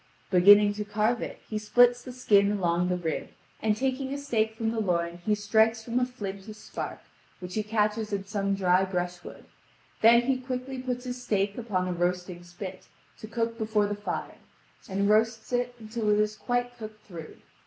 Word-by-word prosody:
Beginning 205 Hz, +3 st, +7 dB
to 210 Hz, 0 st, -4 dB
carve 215 Hz, +3 st, 0 dB
it -, -, -6 dB
he 215 Hz, -, -3 dB
splits 245 Hz, +3 st, +4 dB
the 255 Hz, -, -8 dB
skin 205 Hz, -5 st, +3 dB
along 175 Hz, -2 st, +1 dB
the 180 Hz, -, +1 dB
rib, 165 Hz, -3 st, -3 dB, 0.3 s
and 215 Hz, -1 st, +1 dB
taking 265 Hz, +1 st, -1 dB
a 280 Hz, -, -2 dB
steak 225 Hz, -6 st, -1 dB
from 225 Hz, 0 st, -1 dB
the 230 Hz, -, -2 dB
loin 170 Hz, -4 st, -1 dB
he 210 Hz, -, +4 dB
strikes 220 Hz, +2 st, +2 dB
from 235 Hz, +2 st, 0 dB
a 250 Hz, -, +1 dB
flint 200 Hz, -5 st, -7 dB
a 215 Hz, -, -8 dB
spark, 215 Hz, 0 st, -6 dB, 0.4 s
which 180 Hz, 0 st, -7 dB
he 215 Hz, -, 0 dB
catches 210 Hz, 0 st, 0 dB
in 200 Hz, -1 st, -2 dB
some 200 Hz, 0 st, -1 dB
dry 185 Hz, -1 st, +3 dB
brush 180 Hz, -2 st, -3 dB
wood; -, -, -11 dB, 0.6 s
then 235 Hz, +2 st, +7 dB
he 260 Hz, +1 st, +1 dB
quickly 255 Hz, 0 st, -5 dB
puts 250 Hz, 0 st, -4 dB
his 245 Hz, 0 st, -5 dB
steak 200 Hz, -3 st, 0 dB
upon 200 Hz, -6 st, -2 dB
a 180 Hz, -, -1 dB
roasting 180 Hz, 0 st, -2 dB
spit 185 Hz, +2 st, -9 dB, 0.3 s
to 215 Hz, -, -8 dB
cook 230 Hz, +1 st, -2 dB
before 215 Hz, -1 st, +1 dB
the 205 Hz, -, -2 dB
fire, 205 Hz, 0 st, -5 dB, 0.5 s
and 200 Hz, +1 st, 0 dB
roasts 220 Hz, +2 st, +2 dB
it 245 Hz, 0 st, 0 dB
until 220 Hz, -1 st, -3 dB
it 210 Hz, 0 st, +4 dB
is 210 Hz, 0 st, +1 dB
quite 245 Hz, +2 st, -2 dB
cooked 215 Hz, -1 st, -9 dB
through. 165 Hz, -5 st, -9 dB
215 Hz, 195 wpm, -28 LUFS, 195-235 Hz, 0.6 s, Beginning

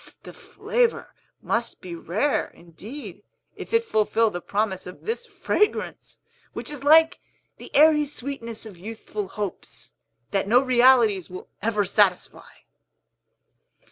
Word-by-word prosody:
The -, -, -10 dB
flavor 480 Hz, -1 st, -1 dB, 0.3 s
must 235 Hz, 0 st, -2 dB
be 180 Hz, -2 st, -8 dB
rare, 195 Hz, -, -1 dB
indeed, 200 Hz, -, -10 dB, 0.3 s
if -, -, -9 dB
it 460 Hz, 0 st, +2 dB
fulfill 220 Hz, -, +1 dB
the 175 Hz, -, -5 dB
promise 200 Hz, -2 st, -2 dB
of 180 Hz, -, -12 dB
this 470 Hz, +2 st, -3 dB
fragrance, 420 Hz, -2 st, -1 dB, 0.4 s
which -, -, -6 dB
is 290 Hz, -2 st, -8 dB
like 320 Hz, +4 st, +5 dB, 0.4 s
the -, -, -11 dB
airy 300 Hz, 0 st, +6 dB
sweetness 245 Hz, -5 st, -6 dB
of 200 Hz, -6 st, -11 dB
youthful 215 Hz, 0 st, -6 dB
hopes, 205 Hz, -1 st, -7 dB, 0.4 s
that 195 Hz, 0 st, 0 dB
no 240 Hz, +4 st, +6 dB
realities 245 Hz, -7 st, +4 dB
will 185 Hz, 0 st, -9 dB
ever 210 Hz, -2 st, 0 dB
satisfy!" 190 Hz, -2 st, +1 dB
225 Hz, 125 wpm, -24 LUFS, 195-285 Hz, 0.4 s, airy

